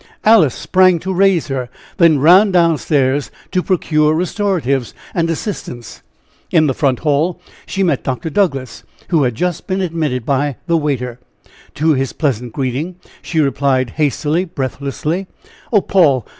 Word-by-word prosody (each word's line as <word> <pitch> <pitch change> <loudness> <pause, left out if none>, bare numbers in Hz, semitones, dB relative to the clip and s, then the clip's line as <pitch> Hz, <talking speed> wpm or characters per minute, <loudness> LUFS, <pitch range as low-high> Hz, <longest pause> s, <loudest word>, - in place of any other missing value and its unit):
Alice 210 - +5
sprang 185 -1 +3
to 190 +3 -4
raise 190 -3 +2
her, 130 -2 -3 0.3
then 170 -5 +5
ran 180 +9 +6
down 170 -3 +4
stairs 140 -2 0 0.2
to 185 - +1
procure 155 -4 +1
restoratives 165 - -1 0.2
and 165 -1 0
assistance. 155 - -5 0.5
In 155 -2 +3
the 135 - +1
front 130 -2 0
hall 155 +4 0 0.3
she 195 - -1
met 165 -8 0
Dr. 135 +5 -3
Douglass, 140 - -1 0.3
who 165 -4 +3
had 125 -2 -1
just 180 +6 -2
been 190 -1 -1
admitted 155 -9 -2
by 140 0 0
the 170 - +1
waiter. 130 -6 -2 0.6
To 155 +2 +2
his 135 -1 -1
pleasant 125 -6 -2
greeting, 135 +8 -3 0.3
she 160 - -2
replied 135 -3 +1
hastily, 150 +4 0
breathlessly: 150 +3 -4 0.4
"Oh, 210 -4 +4
Paul! 150 - +2
155 Hz, 145 wpm, -17 LUFS, 135-180 Hz, 0.6 s, ran